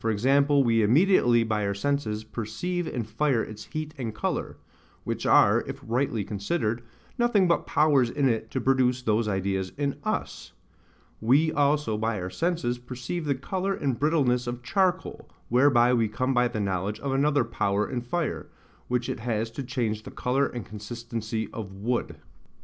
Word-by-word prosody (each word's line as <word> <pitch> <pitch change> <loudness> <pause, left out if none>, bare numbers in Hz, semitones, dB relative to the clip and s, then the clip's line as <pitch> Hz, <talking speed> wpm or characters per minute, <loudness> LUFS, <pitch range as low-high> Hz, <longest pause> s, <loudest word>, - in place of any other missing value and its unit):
g. 135 +6 +4
we 125 -6 +4
immediately 120 - +4
by 110 -2 -1
our 100 0 -1
senses 110 -2 -1
perceive 120 +12 -3
in 120 - -3
fire 115 +3 0
its 110 -1 -8
heat 155 0 -5
and 115 -4 -4
colour; 110 - -3 0.5
which - - -3
are, - - +5
if - - -6
rightly 120 -2 0
considered, 110 - -2 0.4
nothing 225 -6 +3
but 170 - +1
powers 145 -5 +3
in 140 +2 +1
it 115 -2 -1
to 130 - -2
produce 130 -1 +2
those 110 -1 +1
ideas 95 -1 -1
in 140 -1 -1
US: - - -3 0.7
we 140 +8 +4
also 145 -7 +1
by 110 -2 -1
our 90 0 -5
senses 165 - -1
perceive 125 +7 -5
the 140 -2 +1
colour 190 +8 -2
and 135 -8 -2
brittleness 135 -5 +2
of 120 0 -4
charcoal, 185 +4 0 0.2
whereby 125 -1 +4
we 115 -3 +2
come 130 +5 -1
by 125 -1 +3
the 120 -2 -4
knowledge 100 +1 -2
of 140 - -2
another 140 0 +2
power 100 -2 0
in 125 -2 -3
fire, 155 +7 -3 0.4
which 125 -1 -1
it - - -3
has 115 -1 -2
to 130 - -5
change 115 -5 -2
the 125 - -9
colour 135 +2 0
and 120 -4 -6
consistency 110 +1 -5
of 105 -4 -6
WOOD. 115 +5 -2
120 Hz, 165 wpm, -26 LUFS, 110-140 Hz, 0.7 s, are